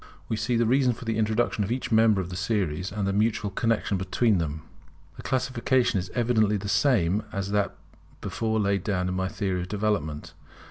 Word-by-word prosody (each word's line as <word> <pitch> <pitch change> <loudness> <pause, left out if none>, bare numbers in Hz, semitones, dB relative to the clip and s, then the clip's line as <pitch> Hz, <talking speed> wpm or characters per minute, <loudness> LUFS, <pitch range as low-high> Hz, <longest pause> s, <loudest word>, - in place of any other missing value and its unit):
We 110 - -1
see 120 +3 -1
the 115 0 +3
reason 125 +1 +3
for 120 - -10
the 115 -1 -1
introduction 110 0 +1
of 100 - -4
each 125 0 -2
member 110 -3 +4
of 90 0 -6
the - - -5
series, 90 -3 -1
and 105 0 -2
the 100 - 0
mutual 105 0 +1
connexion 110 -1 0
between 95 +2 +1
them. 80 -1 -3 0.5
The - - -9
classification 130 -3 +1
is 90 0 -5
evidently 110 -4 +2
the 100 +1 -6
same 105 - +2
as 100 0 -3
that 105 -1 0 0.4
before 110 -1 -1
laid 100 -1 +1
down 90 -3 -1
in - - -2
my 95 0 -1
theory 95 -2 -2
of 90 - -5
development. 100 -8 -2
105 Hz, 195 wpm, -26 LUFS, 95-115 Hz, 0.5 s, member